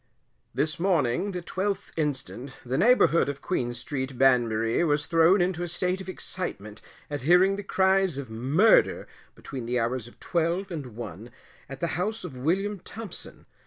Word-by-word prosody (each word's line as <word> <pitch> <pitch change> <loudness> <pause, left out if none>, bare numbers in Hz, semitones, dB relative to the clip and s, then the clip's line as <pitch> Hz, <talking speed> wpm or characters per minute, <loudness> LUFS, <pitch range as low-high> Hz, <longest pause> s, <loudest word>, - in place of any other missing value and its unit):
This 150 +7 0
morning, 170 -2 +1
the 180 -3 -5
12th 195 +3 -3
inst., 145 -4 -2 0.3
the 125 +2 -1
neighbourhood 210 - +4
of 140 -1 -6
Queen 125 -10 -1
st., 130 +1 -5
Banbury, 120 -1 +3
was 150 -2 +1
thrown 165 +3 +4
into 175 -1 0
a 175 - -2
state 180 +2 -1
of 190 - -8
excitement 110 - -6 0.3
at 145 -2 -3
hearing 180 +7 +5
the 200 - -4
cries 190 -4 +2
of 140 -2 -5
murder 135 - +3 0.3
between 130 -5 -7
the 125 +1 0
hours 120 0 -2
of 120 - -17
12 175 +3 -1
and 140 -9 -6
1, 110 -1 -8 0.4
at 135 -1 -8
the 170 - +1
house 220 +4 -2
of 180 -6 -7
Wm. 190 +10 -1
Thompson. 215 +2 -9
160 Hz, 160 wpm, -27 LUFS, 125-185 Hz, 0.4 s, hearing